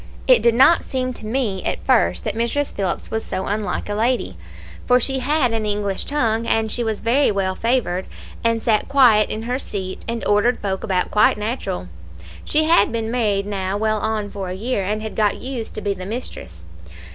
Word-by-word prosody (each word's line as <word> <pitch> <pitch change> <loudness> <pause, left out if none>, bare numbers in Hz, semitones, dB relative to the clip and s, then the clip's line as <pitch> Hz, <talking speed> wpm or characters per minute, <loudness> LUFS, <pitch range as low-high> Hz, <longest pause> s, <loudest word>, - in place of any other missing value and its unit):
"It - - +6
did 235 -1 +3
not 270 +7 +6
seem 255 -2 -2
to 215 - -9
me 220 -6 -1
at - - -3
first 85 -1 +2
that - - -1
Mrs. 235 +6 -1
Phillips 190 -3 -3
was 220 0 -2
so 190 - -4
unlike 205 +1 -2
a 205 - -2
lady, 220 - 0 0.5
for 250 0 +5
she 265 +2 0
had 260 -2 +1
an 225 -1 -1
English 205 -2 -2
tongue, 230 -6 0
and 220 -1 +1
she 240 - -1
was 220 -2 -2
very 255 +5 +3
well 195 -2 0
favoured, 225 -5 -1 0.4
and 230 -1 +1
sat 215 -3 +2
quiet 245 -7 +5
in 220 - -3
her 250 +3 -2
seat, 190 -7 -5
and 230 0 -3
ordered 210 +4 +3
folk 190 -2 -3
about 185 -3 0
quite 210 0 +4
natural. 210 - -3 0.6
She 310 - +2
had 315 -10 +4
been 225 -1 -2
married 210 -5 0
now 195 -1 -2
well 215 0 0
on 215 -1 -2
for 195 -2 -5
a 180 - -4
year, 215 +1 -2
and 210 +3 -2
had 220 - -6
got 210 -2 +1
used 250 -3 -6
to - - -4
be 200 - -1
the 185 -1 -8
mistress. 200 - -6
220 Hz, 205 wpm, -21 LUFS, 200-245 Hz, 0.6 s, It